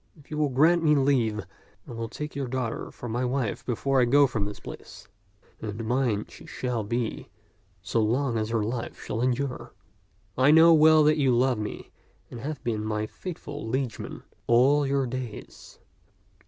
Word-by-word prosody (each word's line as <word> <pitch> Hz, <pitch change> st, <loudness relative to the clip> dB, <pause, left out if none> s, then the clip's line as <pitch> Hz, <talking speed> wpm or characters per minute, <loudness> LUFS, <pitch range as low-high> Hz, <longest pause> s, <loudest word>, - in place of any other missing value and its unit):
If 145 Hz, 0 st, -20 dB
you 150 Hz, -, -3 dB
will 150 Hz, -2 st, +2 dB
grant 160 Hz, +7 st, +4 dB
me 150 Hz, -2 st, +4 dB
leave, 120 Hz, -8 st, +1 dB, 0.4 s
I -, -, -9 dB
will 115 Hz, -1 st, -5 dB
take 150 Hz, +3 st, -6 dB
your 140 Hz, -2 st, -2 dB
daughter 125 Hz, -2 st, -3 dB
for 120 Hz, -, -9 dB
my 120 Hz, +2 st, -2 dB
wife 125 Hz, -3 st, -2 dB
before 130 Hz, +2 st, +1 dB
I -, -, +4 dB
go 140 Hz, +4 st, +5 dB
from 115 Hz, -6 st, -2 dB
this 105 Hz, 0 st, -7 dB
place, -, -, -11 dB, 0.5 s
and 110 Hz, +1 st, -5 dB
mine 120 Hz, -3 st, 0 dB
she -, -, -14 dB
shall 125 Hz, -3 st, -3 dB
be 115 Hz, +2 st, -3 dB, 0.5 s
so 110 Hz, +3 st, 0 dB
long 120 Hz, +3 st, +1 dB
as 110 Hz, -1 st, -1 dB
her 115 Hz, -2 st, 0 dB
life 115 Hz, +2 st, -4 dB
shall 110 Hz, -, -4 dB
endure. 130 Hz, +1 st, -2 dB, 0.6 s
I 130 Hz, +2 st, +4 dB
know 160 Hz, +2 st, +8 dB
well 155 Hz, 0 st, +6 dB
that 155 Hz, +1 st, +4 dB
you 130 Hz, -4 st, +3 dB
love 125 Hz, -2 st, +2 dB
me 105 Hz, -, -6 dB, 0.4 s
and 120 Hz, -, -7 dB
have 145 Hz, +3 st, -5 dB
been 110 Hz, -3 st, -2 dB
my 110 Hz, 0 st, -2 dB
faithful 150 Hz, -, -7 dB
liegeman 130 Hz, -2 st, -3 dB, 0.2 s
all 135 Hz, +5 st, +4 dB
your 135 Hz, -1 st, +1 dB
days. 125 Hz, -3 st, -7 dB
125 Hz, 175 wpm, -26 LUFS, 115-140 Hz, 0.6 s, know